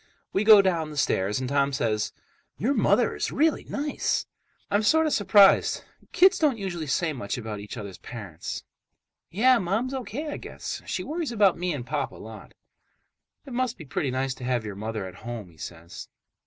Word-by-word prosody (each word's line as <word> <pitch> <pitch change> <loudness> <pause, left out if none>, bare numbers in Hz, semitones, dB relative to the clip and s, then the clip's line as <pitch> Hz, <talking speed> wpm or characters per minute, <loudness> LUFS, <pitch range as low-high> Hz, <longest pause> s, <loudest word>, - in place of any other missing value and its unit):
We 195 - +2
go 210 -2 +8
down 170 -5 0
the 150 - -9
stairs, 105 -5 +1
and 130 - -3
Tom 140 +1 +2
says, 110 -4 0 0.5
"Your 260 +6 +1
mother 220 -1 +3
is - - -2
really 310 +2 +1
nice." 290 +1 -1 0.5
I'm 205 - +3
sort 320 +9 +4
of 310 - +1
surprised—kids 205 - +4
don't 290 -7 +2
usually 175 -6 -4
say 160 +3 0
much 120 -6 -4
about 110 -3 -5
each 105 +3 -8
other's 100 -4 -7
parents. 100 -9 -7 0.7
"Yeah, 245 +6 +4
Mom's 215 +8 -1
O.K. 265 +4 -4
I - - -4
guess - - -6
she - - -2
worries 320 -2 -3
about 205 -5 +4
me 180 0 -1
and 135 -6 -4
Pop 140 +1 -2
a - - -13
lot." 110 -1 -11 0.9
"It 265 - -9
must 250 -1 -1
be 160 - -10
pretty 135 +1 -2
nice 130 +1 -1
to 130 - -11
have 125 -3 0
your 105 - -5
mother 110 0 -4
at 90 -1 -9
home," 120 -6 -6
he 80 - -22
says. 85 +2 -9
160 Hz, 185 wpm, -26 LUFS, -, 0.9 s, go